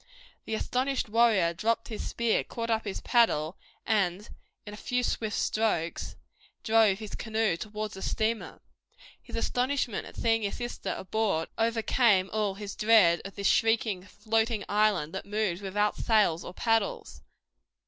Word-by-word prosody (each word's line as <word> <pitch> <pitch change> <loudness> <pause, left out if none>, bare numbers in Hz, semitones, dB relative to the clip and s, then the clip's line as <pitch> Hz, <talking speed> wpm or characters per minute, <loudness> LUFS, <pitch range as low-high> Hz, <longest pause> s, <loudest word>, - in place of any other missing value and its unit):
The 220 - -2
astonished 255 +1 -1
warrior 215 -7 +3
dropped 225 +6 -1
his 220 - -5
spear, 235 -1 0
caught 230 0 -4
up 220 0 0
his 200 - -4
paddle 185 -9 +2 0.3
and 200 -1 0 0.4
in 205 - -8
a - - -6
few 250 +3 -2
swift 220 -2 -1
strokes 210 -7 -1 0.5
drove 220 -3 +4
his 215 -1 -8
canoe 220 -4 0
towards 210 +3 -5
the 190 - -9
steamer. 220 +1 -2 0.6
His - - -10
astonishment 250 0 -1
at - - -13
seeing 225 -1 +1
his 200 -2 -3
sister 240 0 -4
aboard 190 -4 -1
overcame 225 -3 +2
all 210 -3 0
his 205 0 -7
dread 210 -6 +5
of 195 - -8
this 200 - -5
shrieking, 225 -3 +2
floating 220 +3 -1
island 205 -7 +1
that 190 - -6
moved 205 -3 -1
without 205 +2 0
sails 205 -7 +2
or 180 - -9
paddles. 225 -3 -1
215 Hz, 150 wpm, -28 LUFS, 195-225 Hz, 0.6 s, dread